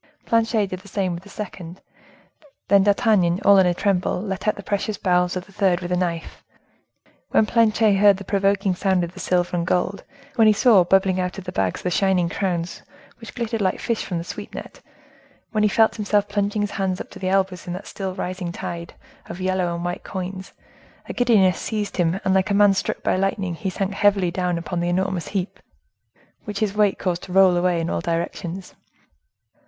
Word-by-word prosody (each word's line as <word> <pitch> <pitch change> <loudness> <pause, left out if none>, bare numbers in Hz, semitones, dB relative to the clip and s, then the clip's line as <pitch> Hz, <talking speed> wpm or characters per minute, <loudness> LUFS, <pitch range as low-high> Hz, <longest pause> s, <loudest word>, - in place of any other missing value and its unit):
Planchet 225 -2 +2
did 185 - -4
the 185 - -16
same 190 -2 -1
with 170 - -6
the 200 - -16
second; 185 -4 -8 0.9
then 200 0 +6
D'Artagnan, 200 -4 +3
all 200 -1 +7
in 185 - +5
a 175 - +2
tremble, 190 -2 0
let 195 +1 -4
out 210 - +2
the 200 - -9
precious 205 +1 -2
bowels 180 -1 +1
of 180 0 -4
the - - -19
third 190 -3 +1
with 175 0 -5
a - - +2
knife. 170 -2 -3 0.9
When 220 - +3
Planchet 220 -2 +3
heard 200 -1 +5
the 200 - -8
provoking 195 0 +1
sound 185 0 +1
of 170 +1 -5
the - - -11
silver 180 -1 0
and 170 -1 -1
gold—when 225 +7 -1
he 215 - +6
saw 210 -3 +5
bubbling 190 +1 +2
out 180 +1 -2
of 195 - -6
the 180 - -6
bags 95 - -1
the 180 - -1
shining 185 -2 +2
crowns, 175 -2 -3 0.4
which 230 - -11
glittered 230 -2 -2
like 185 -2 0
fish 230 -2 -2
from 175 - -4
the 165 - -3
sweep - - -8
net—when 215 - -9
he 210 - +4
felt 220 +3 +3
himself 205 -1 +1
plunging 205 0 -1
his 205 - -3
hands 190 -2 -2
up - - -8
to - - -11
the 185 - -2
elbows 190 -2 0
in 175 - -3
that 185 +3 -7
still 190 -2 -5
rising 180 -1 -4
tide 170 0 -6 0.3
of 170 - -8
yellow 185 -1 0
and 170 +1 -5
white 175 0 -4
coins, 190 0 -6 0.6
a - - -5
giddiness 210 -8 +3
seized 210 -2 -3
him, 175 +1 +1
and 190 - +2
like 190 +1 +2
a 200 - +1
man 205 -1 +5
struck 190 - -3
by - - +1
lightning, 195 -1 -1
he 190 +4 -3
sank 195 +2 -3
heavily 195 -3 +2
down 180 -1 -1
upon 170 +1 -4
the 175 0 -1
enormous 185 -2 -1
heap, 195 +1 -4 0.9
which 210 -1 -5
his 205 -1 0
weight 210 -2 +2
caused 175 -2 -2
to - - -10
roll 190 -1 +5
away 175 -1 +1
in 165 - -2
all - - -2
directions. 170 +2 -4
190 Hz, 205 wpm, -22 LUFS, 180-205 Hz, 0.9 s, all